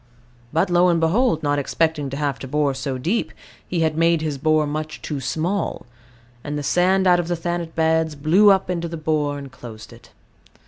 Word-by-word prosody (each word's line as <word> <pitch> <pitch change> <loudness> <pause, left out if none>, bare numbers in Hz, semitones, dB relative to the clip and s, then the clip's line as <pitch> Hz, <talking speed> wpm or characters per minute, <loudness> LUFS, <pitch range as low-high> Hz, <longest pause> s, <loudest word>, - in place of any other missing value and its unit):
But, 165 +3 +1
lo 175 +1 +4
and 170 -1 +2
behold, 165 +2 +1
not 145 0 +1
expecting 150 0 -1
to 135 - -5
have 145 -3 -2
to 135 - -7
bore 145 0 +1
so 135 0 -4
deep, 175 - -1 0.4
he 175 -2 -1
had 160 -1 +1
made 165 0 +2
his 150 -3 -3
bore 155 +1 +2
much 155 +1 -4
too 150 -3 -4
small; 170 +9 -2 0.6
and 150 0 -4
the 145 - -4
sand 185 +5 +2
out 180 -1 +5
of 175 - -2
the 175 - 0
Thanet 170 0 -4
beds 160 -1 +1
"blew 165 +9 +4
up" 195 -1 +3
into 170 -2 -2
the 165 0 -6
bore, 150 -2 -1
and 140 -2 -9
closed 110 -4 -11
it. - - -17
160 Hz, 200 wpm, -22 LUFS, 145-175 Hz, 0.6 s, out